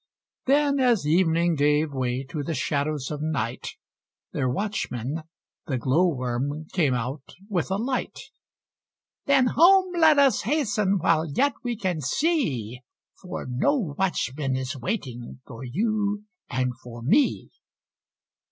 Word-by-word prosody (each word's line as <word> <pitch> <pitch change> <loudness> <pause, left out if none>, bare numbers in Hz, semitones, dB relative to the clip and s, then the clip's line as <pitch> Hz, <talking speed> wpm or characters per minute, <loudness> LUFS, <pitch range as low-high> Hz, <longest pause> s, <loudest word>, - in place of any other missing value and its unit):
Then 280 +1 +3
as 240 - +3
Evening 170 +1 +3
gave 150 +1 +2
way 130 0 -1
to 155 - -3
the 155 +3 -3
shadows 145 -2 -1
of 150 - -4
Night, 135 -7 -3 0.6
Their 130 - 0
Watchman, 145 - -3 0.5
the 130 - -1
Glowworm, 135 0 0
came 150 -8 +2
out 125 +4 -5
with 185 -6 -1
a 190 - 0
light. 250 +6 -2 1.1
"Then 275 -2 +5
home 370 +3 +6
let 320 -3 +5
us 275 -6 +4
hasten, 210 -7 +1
while 165 -2 +2
yet 280 - +2
we 240 -2 -2
can 185 -7 -2
see, 130 - 0 0.4
For 180 - -6
no 130 - +1 0.2
Watchman 145 -7 -1
is 130 -1 -3
waiting 125 - -5
for 115 +1 -9
you 205 - -1 0.3
and 130 -1 -1
for 120 -1 -10
me." 270 - +2
160 Hz, 125 wpm, -25 LUFS, 130-215 Hz, 1.1 s, home